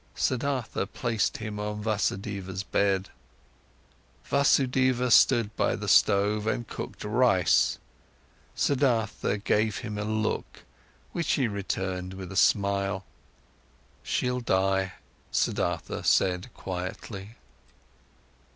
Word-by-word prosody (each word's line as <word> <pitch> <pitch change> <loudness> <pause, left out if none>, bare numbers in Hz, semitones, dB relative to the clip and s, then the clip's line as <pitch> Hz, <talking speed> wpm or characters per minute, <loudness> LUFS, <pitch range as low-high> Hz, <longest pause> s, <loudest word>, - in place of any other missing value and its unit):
Siddhartha 130 -2 -1
placed 115 -3 -1
him 105 -1 -5
on 105 0 -4
Vasudeva's 100 -2 -2
bed. 100 -1 +1 1.2
Vasudeva 130 -3 +2
stood 115 -3 +5
by - - +1
the - - -6
stove 105 +2 +3
and 120 0 -1
cooked - - -7
rice. 105 -4 +3 0.8
Siddhartha 120 -7 +1
gave 110 0 +1
him 105 -3 -5
a - - -1
look, 110 0 -2 0.5
which 170 -2 0
he 130 -4 +2
returned 95 -2 -3
with 95 -1 -8
a - - -7
smile. 100 -1 +2 1.0
"She'll 125 0 -1
die," 95 -3 +1 0.4
Siddhartha - - -1
said 90 +5 +2
quietly. 95 +3 -6
105 Hz, 95 wpm, -27 LUFS, 95-120 Hz, 1.2 s, stood